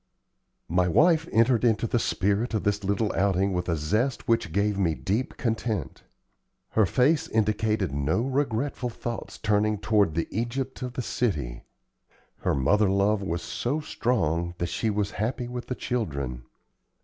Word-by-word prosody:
My 90 +2 +2
wife 160 - +4
entered 115 +1 +3
into 115 -1 +3
the 120 +1 +1
spirit 105 +4 0
of 105 - -1
this 105 0 0
little 100 +2 0
outing 95 0 +1
with 90 0 -2
a 85 - +2
zest 105 - -1
which 115 -8 +1
gave 100 +2 +1
me 85 -5 +2
deep 110 - -2
content. 110 - -2 0.7
Her 110 -3 +3
face 150 - +2
indicated 105 -3 +1
no 70 +8 +1
regretful 130 -1 -1
thoughts 120 0 -6
turning 105 0 +1
toward 105 -5 +2
the 85 - 0
Egypt 125 +4 -3
of 125 -1 -4
the 125 - -3
city; 75 - -2 0.7
her - - 0
mother 100 +10 +3
love 100 +2 +2
was 85 -3 -3
so 135 +6 -2
strong 85 - -1
that 85 +1 -2
she 115 - -1
was 105 -1 -1
happy 120 +2 -1
with 125 0 -6
the 125 - -2
children. 70 - -3
105 Hz, 155 wpm, -26 LUFS, 90-120 Hz, 0.7 s, wife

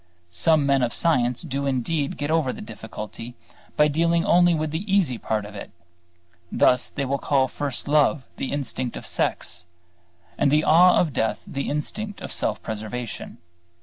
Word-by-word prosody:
Some 145 - +3
men 140 -1 +3
of 120 -1 0
science 125 -6 +2
do 140 -3 -3
indeed 140 +3 -1
get 145 +1 -2
over 160 -5 +2
the - - -9
difficulty 110 +2 -8 0.4
by 150 - +5
dealing 170 +3 +1
only 175 -3 +5
with 155 -1 -2
the 185 +6 -4
easy 165 - +2
part 110 -2 -2
of 105 - -10
it: 100 - -8 0.8
thus, 125 -1 +3
they 140 - -3
will 140 +1 -1
call 135 -2 +2
first 140 -1 -4
love 150 0 +3
the 135 - -3
instinct 130 -3 -3
of - - -9
sex, 85 +1 -2 0.8
and 145 - +4
the 150 +2 +3
awe 180 +3 +6
of 160 -5 +1
death 110 - -1
the 140 0 -4
instinct 205 +8 -4
of - - -6
self - - -2
preservation. 110 +2 -5
140 Hz, 170 wpm, -24 LUFS, 125-160 Hz, 0.8 s, awe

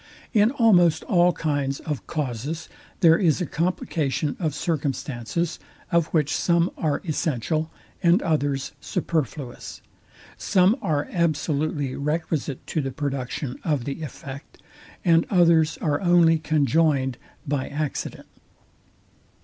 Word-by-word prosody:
In 210 -1 +5
almost 210 - +4
all 175 -1 +4
kinds 145 -4 -1
of 150 -4 -5
causes 150 +2 -3 0.3
there 165 -1 +6
is 170 -4 +3
a 180 - -1
complication 155 -3 -1
of 155 -5 -1
circumstances, 150 0 -2 0.3
of 170 -2 +3
which 155 -2 +1
some 170 0 +2
are 150 -3 -1
essential, 155 +1 -1 0.3
and 175 +1 +5
others 145 -4 0
superfluous; 150 - -3 0.6
some 185 +3 +3
are 145 -2 0
absolutely 155 -4 0
requisite 150 -1 -2
to 155 - -1
the 135 - -3
production 135 -1 -4
of 145 -7 0
the 140 +3 -4
effect, 140 -2 -9 0.5
and 165 -1 +4
others 170 -4 +4
are 150 -2 +1
only 175 -3 +5
conjoined 145 -3 +1 0.3
by 140 -2 -1
accident. 145 0 -4
155 Hz, 115 wpm, -24 LUFS, 140-170 Hz, 0.6 s, there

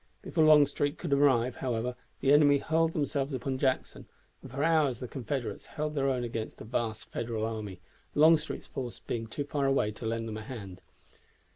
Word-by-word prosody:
Before 160 - +1
Longstreet 150 -1 +4
could 165 -5 -2
arrive, 130 -4 +3
however, 125 -1 -2 0.3
the 140 - +4
enemy 145 -1 +6
hurled 160 +2 +1
themselves 140 -2 -1
upon 130 +1 -3
Jackson, 130 -1 -1 0.3
and 135 - -10
for 135 +4 -2
hours 155 -7 +3
the 125 - -5
Confederates 130 0 -4
held 150 0 -1
their 135 -2 +1
own 125 -2 0
against 115 -2 -4
the - - -9
vast 110 -2 -3
Federal 115 -2 -2
army, 105 -4 -5 0.4
Longstreet's 155 +1 +4
force 125 -3 -5
being 115 -1 -4
too 145 +6 -4
far 140 -1 -1
away 135 -6 +2
to 110 +2 -6
lend 115 0 -2
them 110 -1 -5
a - - -6
hand. 105 -7 -8
130 Hz, 180 wpm, -30 LUFS, 115-145 Hz, 0.4 s, enemy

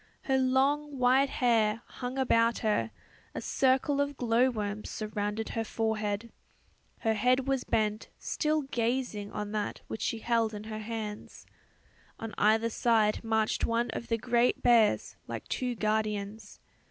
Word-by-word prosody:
Her 265 -1 +2
long 275 +3 +1
white 260 +2 +4
hair 230 -3 +2
hung 250 +1 -6
about 230 -3 +3
her; 115 - +1 0.5
a - - -2
circle 270 +2 +2
of 285 -1 -2
glow 245 +1 +3
worms 210 -3 -4
surrounded 210 0 -3
her 225 - -2
forehead. 220 0 -2 0.7
Her 225 -2 +2
head 250 +4 +2
was 270 -2 +1
bent, 215 0 -1
still 305 -1 0
gazing 235 -5 -2
on 210 -1 -4
that 210 -1 -3
which 220 - -6
she 225 - -1
held 225 -1 0
in 205 - -6
her 215 0 -6
hand. 215 -1 -5 0.9
On 225 -2 -6
either 220 +2 +3
side 220 -2 +2
marched 220 -1 0
one 230 +1 +1
of 235 - -5
the 230 -1 +1
great 240 +1 +1
bears 230 -4 +3
like - - -6
two 250 -1 -2
guardians. 215 -1 -2
230 Hz, 145 wpm, -30 LUFS, 215-250 Hz, 0.9 s, white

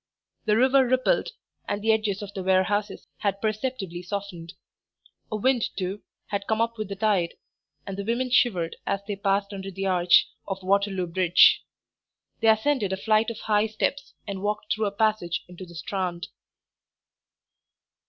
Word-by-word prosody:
The 210 0 +3
river 260 +1 +4
rippled, 255 - +2 0.4
and 205 - -1
the 225 - +4
edges 215 -2 0
of 200 0 -8
the 195 - -4
warehouses 190 +3 +1
had 200 -1 -1
perceptibly 215 -4 -3
softened; 180 -3 -6 0.8
a - - -1
wind, 245 +2 +2
too, 190 +2 -3 0.3
had 200 -1 -3
come 220 0 +1
up 230 0 0
with 215 -2 -3
the 200 - -4
tide, 195 -4 +1 0.5
and 195 - -5
the 200 - -4
women 240 +4 -1
shivered 180 -10 +2
as 200 0 0
they 205 - -2
passed 200 +1 0
under 195 0 -6
the 195 +1 -4
arch 180 -2 +4 0.2
of 195 -1 -4
Waterloo 195 -1 +1
Bridge. 175 0 +5 0.8
They 225 - +1
ascended 220 -1 +3
a 190 - -1
flight 215 +3 +2
of 230 -1 -6
high 210 0 +2
steps 275 +6 -2
and 195 -2 -5
walked 210 +1 -1
through 215 -1 0
a - - -2
passage 205 -5 0
into 180 +1 -10
the 170 - -13
Strand. 185 +2 -3
200 Hz, 165 wpm, -26 LUFS, 190-220 Hz, 0.8 s, Bridge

